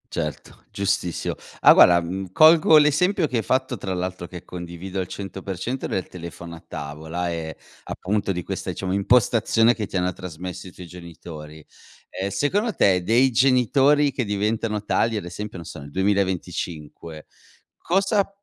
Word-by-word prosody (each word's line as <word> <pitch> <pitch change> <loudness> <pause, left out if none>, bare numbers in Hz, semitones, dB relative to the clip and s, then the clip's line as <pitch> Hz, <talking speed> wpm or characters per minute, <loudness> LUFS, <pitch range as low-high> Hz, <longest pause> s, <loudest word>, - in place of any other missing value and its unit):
Certo, - - -5
giustissimo, 100 -3 -2 0.2
ah, - - +8
guarda, 85 -1 +7
mhmm, 95 +2 -5
colgo 155 - +7
l'esempio 160 +5 +3
che 130 - -2
hai 115 - -1
fatto, 130 -1 0
tra 95 -1 -4
l'altro 90 -1 -4
che 90 0 -10
condivido 90 +2 -7
al 90 - -2
100%, 95 +5 -5
del 95 - -3
telefono 85 -1 -9
a - - -12
tavola 80 +4 -5
e, 80 -2 -5 0.3
appunto, 100 +1 -2
di 90 -1 -4
questa, - - -4
diciamo, 95 -1 -4
impostazione 115 +2 +3
che 110 -3 -4
ti - - -10
hanno 90 0 +1
trasmesso 90 +1 -8
i 90 - -12
tuoi 90 - -10
genitori; 80 -3 -11 0.4
ehm, 95 +1 -4
secondo 195 - 0
te, 95 -2 +3
dei 120 +7 +3
genitori 135 +4 +3
che 130 -2 -2
diventano 105 +1 -1
tali, 115 +1 +1
ad 105 - -3
esempio, 100 +4 -7
non 85 - -9
so, - - -9
nel 70 0 -11
2025 90 -5 -3 0.5
cosa 195 +3 +1
95 Hz, 155 wpm, -23 LUFS, 85-120 Hz, 0.5 s, ah